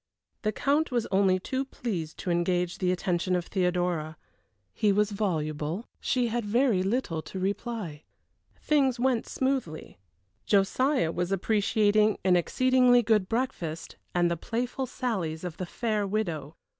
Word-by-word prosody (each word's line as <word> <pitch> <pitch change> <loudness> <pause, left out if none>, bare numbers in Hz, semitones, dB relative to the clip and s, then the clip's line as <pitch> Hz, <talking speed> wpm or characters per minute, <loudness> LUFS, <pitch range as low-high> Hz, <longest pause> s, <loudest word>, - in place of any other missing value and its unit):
The 215 - 0
Count 285 +8 +1
was 240 -2 0
only 190 -1 +3
too 260 +8 -2
pleased 190 - -5
to 180 - -3
engage 175 +1 0
the 180 -1 +1
attention 180 0 0
of 175 -1 -1
Theodora. 175 -4 -1 0.6
He 210 - +2
was 210 +1 +2
voluble; 160 -2 -2
she 245 -2 0
had 235 +1 -1
very 225 -1 +2
little 190 -5 -1
to 175 - -8
reply. 195 -4 -3 0.6
Things 270 -5 +2
went 250 -2 +1
smoothly. 260 - -2 0.5
Josiah 205 - +2
was 175 +2 -2
appreciating 210 +1 +2
an 185 -1 +5
exceedingly 250 +6 +4
good 215 -4 +2
breakfast, 225 -10 -3 0.2
and 175 -1 +3
the - - +1
playful 245 - -3
sallies 185 -11 -3
of 175 -3 -5
the 185 -2 -4
fair 215 -1 -1
widow. 165 -8 -2
200 Hz, 140 wpm, -28 LUFS, 175-240 Hz, 0.6 s, an